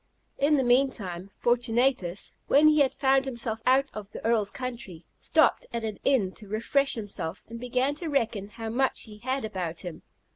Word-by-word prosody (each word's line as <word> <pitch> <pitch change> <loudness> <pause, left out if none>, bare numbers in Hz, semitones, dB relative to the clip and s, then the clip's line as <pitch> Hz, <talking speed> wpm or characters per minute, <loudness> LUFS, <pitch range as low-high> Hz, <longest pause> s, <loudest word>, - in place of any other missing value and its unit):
In 295 +2 +4
the 265 - +2
meantime, 235 -8 +1
Fortunatus, 240 -5 +1
when 300 +2 +6
he 295 -3 +4
found 270 0 +2
himself 235 -4 -3
out 265 +2 +5
of 210 -2 -7
the - - -9
Earl's 225 -3 +2
country, 235 -10 -7
stopped - - +2
at 235 -1 -3
an 215 -2 -4
inn 230 -9 +2
to 210 - -9
refresh 230 +7 0
himself, 195 -5 -4
and 230 0 -7
began 250 +3 0
to 335 - -4
reckon 225 -8 0
how 225 +1 -7
much 265 +4 +1
he 210 -2 -11
had 260 +1 -2
about 185 -6 -4
him. 175 -4 -7
235 Hz, 175 wpm, -27 LUFS, 210-265 Hz, -, when